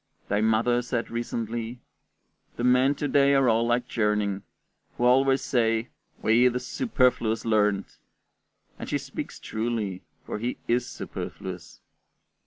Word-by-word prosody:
Thy 105 +1 +1
mother 110 +2 +2
said 120 -1 -3
recently, 115 0 -3 0.8
"The 120 - -4
men 125 +3 +4
to 145 - -2
day 140 0 +4
are 135 -1 +4
all 115 0 +3
like 120 +1 +1
Gerning, 105 -3 0 0.6
who - - -2
always 135 +2 +4
says, 115 -2 +1 0.4
'We, 115 +3 +5
the 125 0 0
superfluous 125 - +1
learned';" 105 -3 +2 0.9
and - - -6
she - - +1
speaks - - -7
truly, 110 -4 -3 0.2
for - - -4
he 120 +3 -2
is 120 +1 +1
superfluous. 90 -3 -7
120 Hz, 130 wpm, -26 LUFS, 110-125 Hz, 0.9 s, We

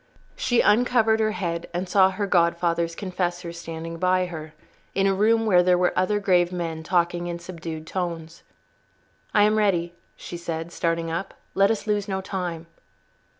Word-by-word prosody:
She 245 -2 +2
uncovered 225 0 +3
her 215 -1 +1
head 170 -4 -3
and 180 +2 -2
saw 190 +1 +5
her 190 +2 -2
godfather's 170 -2 +1
confessor 175 -2 -3
standing 165 0 -7
by 185 0 +2
her, 155 -3 -8 0.4
in 195 - +2
a 195 - +3
room 225 +3 +3
where 180 -5 +5
there 180 0 +3
were 180 0 +2
other 195 +3 +1
grave 180 -3 +3
men 165 -3 -3
talking 175 +1 0
in 170 0 -3
subdued 165 -2 -7
tones. 170 -2 -4 0.9
"I 205 - +4
am 215 +1 +3
ready," 175 -5 +1 0.2
she 175 - -8
said, 165 -1 -5
starting 165 -1 -1
up. 170 +4 -4 0.2
"Let 195 +1 +4
us 220 -2 -1
lose 210 -1 0
no 190 -1 -2
time." 180 -4 -4
180 Hz, 165 wpm, -24 LUFS, 170-195 Hz, 0.9 s, saw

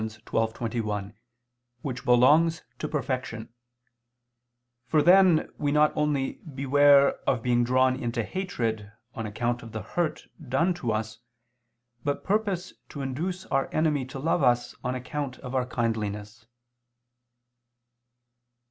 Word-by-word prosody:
12:21], 110 -1 -3 0.7
which 125 -3 -4
belongs 145 +7 +4 0.2
to 150 - -2
perfection: 125 -5 -3 1.3
for 150 +3 +3
then 180 -2 +6
we 145 -1 0
not 150 +1 +3
only 150 -3 -1
beware 140 +1 +5
of 125 -4 0
being 120 -1 +2
drawn 130 +1 +3
into 120 -2 -2
hatred 115 - -3 0.2
on 115 -2 -4
account 120 +3 -2
of 115 - -11
the 110 -2 -4
hurt 170 - -2 0.2
done 170 +8 +2
to 130 -10 -3
us, 110 0 -3 0.8
but 145 -1 -2
purpose 200 -3 -1 0.2
to 140 - -6
induce 175 +8 -3
our 135 0 +1
enemy 155 -3 +1
to 130 +2 -8
love 155 +4 0
us 120 -2 +2
on 125 +1 -1
account 130 +1 -4
of 130 -1 -8
our 130 -1 0
kindliness. 110 -2 -3
130 Hz, 120 wpm, -27 LUFS, 115-150 Hz, 1.3 s, then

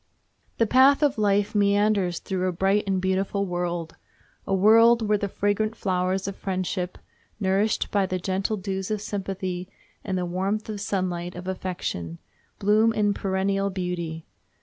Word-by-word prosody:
The 230 - +3
path 265 +6 +5
of 280 -6 +2
life 205 0 +2
meanders 200 -3 +2
through 185 -1 -2
a - - +1
bright 195 +4 +1
and 190 -1 +1
beautiful 190 +2 0
world—a 175 0 -6
world 225 +3 +5
where 210 0 +3
the 200 - -1
fragrant 205 +3 0
flowers 185 -1 -1
of 200 - -4
friendship, 185 -1 -3 0.4
nourished 200 +2 +1
by 200 -2 +2
the 185 - -1
gentle 190 +4 -1
dews 190 -1 -4
of 215 -1 -1
sympathy 190 -3 -4 0.3
and 190 -2 -2
the 180 - -1
warm 190 +4 -1
sunlight 190 -5 -3
of 180 +1 -8
affection, 180 - -4 0.4
bloom 215 +3 +3
in 205 -1 +2
perennial 195 0 0
beauty. 175 -4 -4
195 Hz, 145 wpm, -25 LUFS, 185-205 Hz, 0.4 s, path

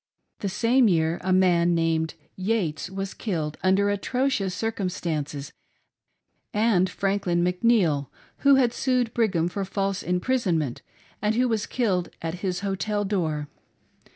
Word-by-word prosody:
The 200 - -2
same 235 +5 +3
year 165 -3 +1
a 185 - 0
man 175 -2 +4
named 165 -1 0 0.2
Yates 185 -5 -1
was 195 0 -4
killed 160 -8 -3
under 195 +2 +3
atrocious 205 -2 0
circumstances; 165 -9 -3 1.0
and 205 -4 +3
Franklin 195 -3 0
McNeil 180 - +2 0.3
who 280 -1 +5
had 250 -3 +3
sued 250 -3 0
Brigham 185 -8 +1
for 195 +3 -3
false 195 0 -2
impris, 220 +7 0
onment 150 -7 -1 0.4
and 210 +1 +1
who 250 +2 +3
was 220 -3 -1
killed 195 -8 0
at 165 +2 -4
his 180 -2 -2
hotel 205 +1 -1
door. 160 -7 -1
190 Hz, 130 wpm, -25 LUFS, 170-220 Hz, 1.0 s, who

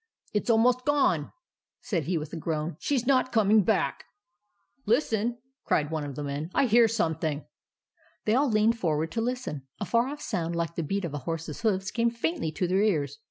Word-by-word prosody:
It 210 - -1
's - - -3
almost 240 +2 +4
gone," 275 - +2 0.5
said 170 - -2
he, 175 0 0
with 155 -1 -6
a - - -3
groan. 160 0 -2
" - - -44
She 285 - 0
's 245 - -1
not 255 -1 +3
coming 215 -1 +5
back." 190 -9 0 0.4
" 210 +4 -46
Listen! 235 -1 +1
" 265 - -57
cried 150 0 +1
one 160 -2 -2
of 140 -2 -6
the 150 - -4
men. 145 +3 -4
" - - -26
I 275 - +4
hear 235 0 +5
something." 160 -8 -1 0.8
They 215 - +2
all 270 +3 +3
leaned 220 +1 +3
forward 160 -2 0
to 225 - -1
listen. 235 - -3
A 205 - -2
far 235 +7 +2
off 290 +2 -6
sound 170 -5 -2
like 170 0 -2
the 170 - -2
beat 195 +5 -2
of 160 - -5
a 145 - -3
horse's 165 -2 -4
hoofs 195 -4 0
came 235 0 +2
faintly 165 -8 -2
to 180 +3 -1
their 190 +3 +2
ears. 145 -10 0
200 Hz, 220 wpm, -27 LUFS, 160-230 Hz, 0.8 s, coming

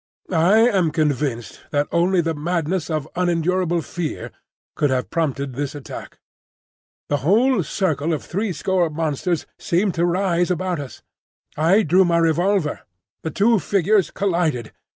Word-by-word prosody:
I 175 +5 +4
am 195 -8 +3
convinced 140 - -2
that 145 0 0
only 175 +2 +2
the 165 0 -1
madness 170 +2 -2
of 155 -3 -2
unendurable 175 -1 0
fear 170 -1 -5 0.4
could 145 - +1
have 130 -1 -1
prompted 140 -5 -1
this 140 +2 -4
attack. 145 - -9 0.9
The 145 - +1
whole 210 - +3
circle 160 -2 -1
of 155 - -2
threescore 185 -2 -1
monsters 160 +2 -2
seemed 185 +2 0
to 170 +1 +1
rise 175 -1 +1
about 180 -1 -1
us. 140 -3 -9 0.5
I 170 +8 +3
drew 185 +3 +4
my 170 -2 +2
revolver. 165 - +1 0.4
The 160 - -3
two 220 +5 +3
figures 195 +3 +2
collided. 170 - -1
170 Hz, 135 wpm, -21 LUFS, 150-185 Hz, 0.9 s, I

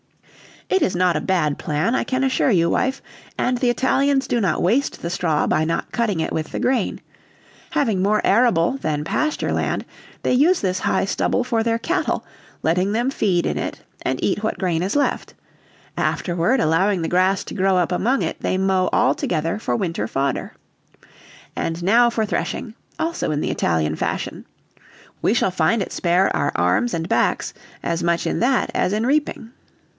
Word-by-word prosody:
"It 380 - +1
is 180 - +1
not 180 -1 +2
a - - -2
bad 160 -6 0
plan, 155 +10 0
I - - +1
can 260 +1 -1
assure 265 0 +2
you, 170 -6 +3
wife, 265 +8 0 0.3
and 250 0 +1
the 245 0 +1
Italians 270 +3 +2
do 240 - 0
not 185 -6 0
waste 240 +11 +1
the 170 - -3
straw 165 -4 0
by 155 - +1
not 165 +1 -2
cutting 215 -8 0
it - - -2
with 155 -1 -3
the - - -3
grain; 250 -5 0 0.7
having 235 - +1
more 210 +2 +2
arable 230 0 +3
than 150 - -2
pasture 305 - -1
land, - - -1 0.4
they - - +1
use 315 +8 +4
this 185 -1 0
high - - +1
stubble 245 - 0
for 235 -2 0
their 230 0 +1
cattle, 335 +7 -1 0.4
letting 180 +5 +1
them 240 +4 0
feed 185 -9 +1
in - - -1
it, - - -5 0.2
and 130 - -2
eat 205 +1 0
what 220 - -2
grain 175 -4 0
is 195 +7 -2
left; 290 - -1 0.6
afterward, 175 +9 0
allowing 180 +2 +2
the 160 - -2
grass 185 +2 +2
to - - -8
grow 190 0 +2
up 180 -1 +1
among 240 +9 +1
it, - - -3
they 185 - -1
mow 190 -1 +2
all - - +4
together 165 +4 -2
for - - -1
winter 165 - -2
fodder. 135 +2 -2 1.0
And 165 +1 -3
now 235 +6 +5
for 225 -2 -1
threshing, 205 +4 -3 0.2
also 335 +1 -2
in 150 -1 -1
Italian 80 -2 0
fashion. - - -3 0.8
We 215 - +2
shall 190 - +2
find 180 +6 +1
it - - -9
spare 180 +2 +2
our 145 - 0
arms 90 - +1
and 165 0 -3
backs - - +1 0.3
as 170 0 -1
much 170 0 0
in - - -1
that 260 +2 +1
as 185 - +1
in 215 +2 0
reaping." 275 -4 -1
190 Hz, 180 wpm, -21 LUFS, 170-240 Hz, 1.0 s, now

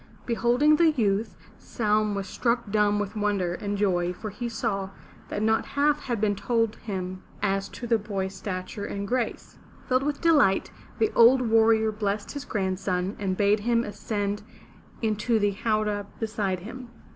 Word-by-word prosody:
Beholding 245 +6 +3
the 335 0 +5
youth, 220 -7 0 0.2
Saum 215 -2 0
was 195 0 -3
struck 235 -3 -1
dumb 210 -1 +3
with 205 +1 -3
wonder 205 -4 0
and 205 +2 -3
joy, 180 -3 +1
for 215 +3 -7
he 240 +4 -4
saw 210 -4 -2 0.4
that 205 - -2
not 220 0 +2
half 285 +2 +2
had 240 -4 -3
been 205 -1 +1
told 225 +2 0
him 185 -3 -5 0.2
as 195 -1 0
to 245 - -8
the 230 -1 +2
boy's 195 -2 -3
stature 185 +1 -5
and 200 0 -4
grace. 245 0 -3 0.3
Filled 255 0 +2
with 290 +1 -2
delight, 295 - +3 0.3
the 440 - +2
old 250 +3 +6
warrior 220 -1 +4
blessed 205 -1 -2
his 285 -1 -6
grandson 190 -2 -1
and 190 -2 -1
bade 205 +1 +3
him 235 +2 +1
ascend 205 -1 -3 0.6
into 220 +1 +1
the 205 -1 +2
howdah 210 -1 -1
beside 210 -5 -2
him. 245 +5 -9
210 Hz, 160 wpm, -26 LUFS, 200-235 Hz, 0.6 s, old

